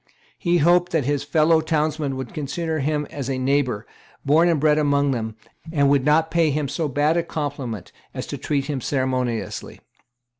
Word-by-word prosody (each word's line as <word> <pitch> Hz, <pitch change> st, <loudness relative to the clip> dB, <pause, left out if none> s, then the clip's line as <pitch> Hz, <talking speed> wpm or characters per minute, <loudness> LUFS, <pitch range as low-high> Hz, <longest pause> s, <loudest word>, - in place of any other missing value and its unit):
He 175 Hz, -1 st, +2 dB
hoped 175 Hz, +2 st, +3 dB
that 155 Hz, -6 st, +1 dB
his 145 Hz, 0 st, 0 dB
kind 145 Hz, -, -18 dB
fellow 160 Hz, +1 st, +4 dB
townsmen 155 Hz, -3 st, -1 dB
would 130 Hz, -3 st, -6 dB
consider 155 Hz, +2 st, -3 dB
him 150 Hz, +1 st, 0 dB
as 140 Hz, -2 st, -5 dB
a 135 Hz, -, -1 dB
neighbour, 130 Hz, -4 st, 0 dB, 0.4 s
born 160 Hz, +5 st, +4 dB
and 165 Hz, -3 st, +2 dB
bred 150 Hz, +1 st, +3 dB
among 140 Hz, -1 st, +2 dB
them, 110 Hz, -3 st, -3 dB, 0.4 s
and 140 Hz, -3 st, +3 dB
would 140 Hz, -2 st, +3 dB
not 160 Hz, +2 st, +3 dB
pay 165 Hz, -2 st, +3 dB
him 145 Hz, 0 st, -1 dB
so 150 Hz, +3 st, -2 dB
bad 145 Hz, +4 st, +1 dB
a 170 Hz, -, +1 dB
compliment 140 Hz, -, -5 dB, 0.2 s
as -, -, -5 dB
to -, -, -5 dB
treat 140 Hz, -2 st, -1 dB
him 140 Hz, -2 st, -3 dB
ceremoniously. 130 Hz, -3 st, -2 dB
145 Hz, 185 wpm, -22 LUFS, 135-160 Hz, 0.4 s, fellow